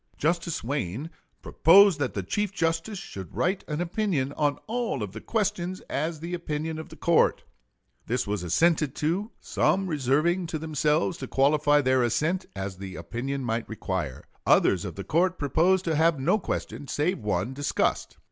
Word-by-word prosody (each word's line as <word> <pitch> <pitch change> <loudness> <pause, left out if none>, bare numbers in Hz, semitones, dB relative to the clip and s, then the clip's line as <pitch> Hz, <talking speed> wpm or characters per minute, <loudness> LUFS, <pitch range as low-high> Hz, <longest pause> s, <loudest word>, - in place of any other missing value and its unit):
Justice 170 -1 -1
Wayne 135 - -3 0.3
"proposed 190 0 +6
that 140 -3 -2
the 100 - -2
Chief 205 - -1
Justice 165 +4 -1
should 95 - -8
write 185 +2 0
an 150 0 -3
opinion 175 -7 -1
on 145 -2 0
all 225 - -2
of 100 - -5
the 110 +2 -8
questions 190 -4 -1
as 155 +2 -2
the 170 +2 -5
opinion 160 -2 -3
of 160 - -8
the - - -11
court. 170 -1 +2 0.6
This 125 +2 0
was 105 -2 -2
assented 150 - +2
to, 175 +8 -1
some 195 +1 +1
reserving 160 +3 +1
to 160 - -3
themselves 155 +2 0
to 130 - -5
qualify 145 +2 +3
their 130 -1 +3
assent 155 - 0
as 95 -1 -5
the 95 -1 -7
opinion 135 +3 -4
might 115 -1 -2
require. 95 -10 -4 0.2
Others - - +4
of - - -6
the 100 - -5
court 175 - +1
proposed 170 +7 +2
to 165 - +1
have 160 -1 +3
no 175 +11 +2
question, 145 -6 -4
save 165 +8 0
one, 105 +1 -1
discussed." 145 +1 -1
150 Hz, 165 wpm, -27 LUFS, 130-175 Hz, 0.6 s, proposed